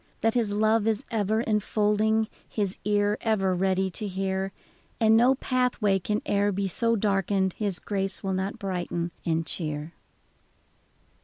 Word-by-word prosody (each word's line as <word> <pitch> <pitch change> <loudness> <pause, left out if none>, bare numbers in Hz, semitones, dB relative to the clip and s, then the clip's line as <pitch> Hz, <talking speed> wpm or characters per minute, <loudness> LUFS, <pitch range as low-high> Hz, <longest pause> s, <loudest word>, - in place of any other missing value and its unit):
That 225 0 +2
His 230 -4 +1
love 215 +1 +2
is 225 +3 0
ever 220 0 +1
enfolding, 215 0 +1 0.2
His 200 -3 -2
ear 205 0 +1
ever 195 -4 +1
ready 190 +1 +1
to 210 +4 -3
hear. 190 0 -2 0.5
And 220 -1 +5
no 245 +4 +5
pathway 250 -7 +1
can 210 +3 -2
e'er 205 0 +2
be 195 0 -1
so 230 +5 +2
darkened 195 -2 +1
His 200 -4 0
grace 195 -1 -2
will 195 -1 -1
not 190 +4 -2
brighten 175 -4 -3 0.2
and 165 0 +1
cheer 155 0 -4
205 Hz, 145 wpm, -26 LUFS, 190-220 Hz, 0.5 s, And